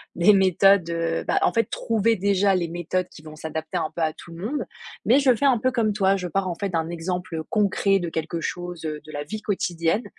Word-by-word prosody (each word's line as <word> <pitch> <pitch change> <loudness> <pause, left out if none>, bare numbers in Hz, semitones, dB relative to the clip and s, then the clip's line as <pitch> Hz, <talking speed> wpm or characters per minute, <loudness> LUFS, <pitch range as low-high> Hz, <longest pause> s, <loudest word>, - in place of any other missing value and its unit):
des 175 +5 +6
méthodes, 190 -1 +4
heu, 165 0 -1
bah - - +2
en - - +3
fait, 230 -1 +2
trouver 225 0 +1
déjà 195 0 +2
les 170 -2 -1
méthodes 175 +2 -2
qui 155 - -14
vont 155 0 -11
s'adapter 160 +2 -4
un 160 -2 -2
peu 170 - -4
à 155 -1 +1
tout 170 - -13
le 175 +5 -7
monde. 290 +5 -2 0.4
Mais 260 +5 +5
je 260 -3 +4
fais 285 - -5
un 260 -3 +5
peu 255 +3 +1
comme 225 -4 +1
toi, 195 -1 +2
je 180 -2 -3
pars 190 +2 -1
en 175 - -2
fait 200 +1 -3
d'un 165 -2 -1
exemple, 175 0 -4
heu, 160 - -3
concret 200 -1 +2
de 175 - -3
quelque 165 +1 -3
chose, 175 -1 -5
heu, 150 -1 -4
de 155 - -10
la 145 -1 -4
vie 215 +7 -6
quotidienne. 180 0 0
180 Hz, 250 wpm, -24 LUFS, 165-200 Hz, 0.4 s, des